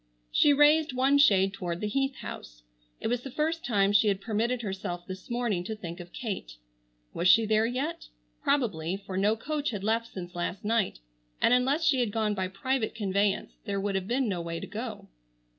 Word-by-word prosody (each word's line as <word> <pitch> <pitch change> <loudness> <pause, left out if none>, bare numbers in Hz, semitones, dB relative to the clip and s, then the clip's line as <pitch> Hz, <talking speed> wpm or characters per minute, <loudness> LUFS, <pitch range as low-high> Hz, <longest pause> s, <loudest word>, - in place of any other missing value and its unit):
She 295 - +5
raised 295 0 +5
one 270 +3 +3
shade 195 -7 +5
toward 175 -3 -4
the 210 - -3
Heath 270 +4 0
house. - - -9 0.4
It - - -8
was 245 +1 0
the 270 - -7
first 315 +5 -1
time 200 -4 +2
she 205 +1 +5
had 195 -2 +2
permitted 230 +4 -1
herself 190 -3 -4
this 185 0 -8
morning 235 -7 -1
to 220 - -3
think 175 -4 -7
of 175 0 -10
Kate. 195 - -5 0.6
Was 175 - 0
she 225 +5 +7
there 215 +1 +3
yet? 265 +7 -3 0.3
Probably, 195 - 0
for 195 -1 -8
no 205 +3 +3
coach 295 +5 -2
had 205 -4 -4
left 225 +2 +1
since 180 -2 -7
last 175 +3 -4
night, 220 - +1 0.4
and - - +4
unless 265 +6 +2
she 285 -4 +4
had 240 -4 +1
gone 215 -1 0
by 190 -2 -1
private 230 +5 -2
conveyance 200 -2 0
there 200 -1 -1
would 200 0 -1
have 190 -1 -2
been 255 +2 +1
no 185 -4 -1
way 165 0 -4
to - - -6
go. 220 +1 -6
215 Hz, 200 wpm, -28 LUFS, 190-250 Hz, 0.6 s, she